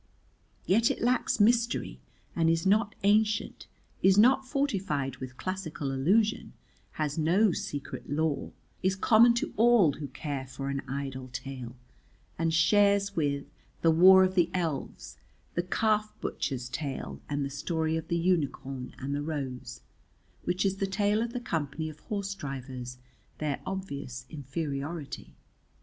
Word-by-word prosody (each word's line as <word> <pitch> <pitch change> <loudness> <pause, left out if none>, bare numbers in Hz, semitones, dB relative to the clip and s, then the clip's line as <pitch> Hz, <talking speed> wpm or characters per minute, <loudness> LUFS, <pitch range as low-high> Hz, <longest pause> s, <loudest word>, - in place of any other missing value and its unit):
Yet 225 +5 +4
it - - -2
lacks 245 -1 +1
mystery 235 +2 +2 0.4
and 165 -1 +3
is 165 +1 +1
not 210 +2 +3
ancient, 210 +1 +2 0.3
is 190 +1 +5
not 260 +4 +5
fortified 195 - -1
with 130 0 -8
classical 180 -7 -4
allusion, 205 - +1 0.4
has 150 0 -2
no 180 +7 +4
secret 145 -4 -5
lore, 150 0 -1 0.3
is 190 +1 +1
common 235 +4 +5
to 235 - -2
all 225 -7 +6
who 145 0 -6
care 135 0 -5
for 135 +2 -5
an 140 - -2
idle 135 -1 -4
tale, 125 -1 -6 0.6
and 165 0 +1
shares 200 +4 +3
with 140 -3 0 0.4
"The 165 - +6
Wars 185 +3 +7
of - - -9
the 175 -3 +3
Elves," 165 -6 -3 0.3
the 175 - +1
Calf 215 +4 +1
butcher's 130 -3 -3
tale, 135 +3 -5
and 145 -1 -1
"The 140 - -5
Story 160 +2 -1
of 160 0 -3
the 170 - 0
Unicorn 140 -7 -1
and 135 +2 -4
the 145 - -1
Rose," 135 -5 -5 0.6
which 180 +2 0
is 195 0 +1
the 195 - -1
tale 205 +2 +1
of 235 0 -2
the 245 - -3
Company 160 - -3
of 155 -1 -12
Horse 200 -1 -3
drivers, 130 -7 -6 0.4
their 150 -3 -2
obvious 140 -10 -5
inferiority. 145 +1 -5
165 Hz, 145 wpm, -29 LUFS, 140-200 Hz, 0.6 s, Wars